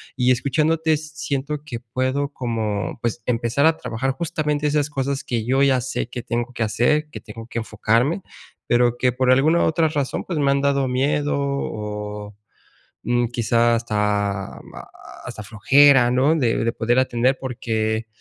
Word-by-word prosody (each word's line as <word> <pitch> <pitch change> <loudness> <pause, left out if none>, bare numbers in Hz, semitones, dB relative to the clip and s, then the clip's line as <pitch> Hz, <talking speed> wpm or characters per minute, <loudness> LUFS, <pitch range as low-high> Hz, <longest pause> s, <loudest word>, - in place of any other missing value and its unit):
y 125 0 +2
escuchándote 155 +5 +1
siento 150 -2 -4
que 120 -6 -6
puedo 130 +4 -2
como, 110 -4 -3
pues, 120 0 -3
empezar 120 +3 +1
a 160 0 +4
trabajar 125 +2 -2
justamente 150 -1 -2
esas 145 0 +1
cosas 140 0 -2
que 115 -3 -2
yo 135 +2 +2
ya 130 -2 +3
sé 125 -1 -3
que 125 -1 -5
tengo 120 0 -3
que 120 - -7
hacer, 150 +8 +1
que - - -8
tengo 115 +1 -10
que 120 - -7
enfocarme, 115 - 0 0.5
pero, 120 0 +3
que 125 -1 +1
por 130 +1 +2
alguna 155 +6 +4
otra 160 0 +2
razón, 145 -3 -2
pues 170 -4 -3
me 140 -1 +3
han 140 - +2
dado 140 -1 +1
miedo 145 +3 0
o, 105 -6 -4 0.7
mm, 120 0 +1
quizá 120 0 +2
hasta 105 -3 -1 0.6
hasta 105 - -7
flojera, 125 +4 +5
¿no?, 135 +6 +3
de 120 -6 +1
de 115 - +1
poder 120 +3 0
atender, 130 +1 +2
porque, 110 -3 -2
125 Hz, 160 wpm, -22 LUFS, 115-140 Hz, 0.7 s, flojera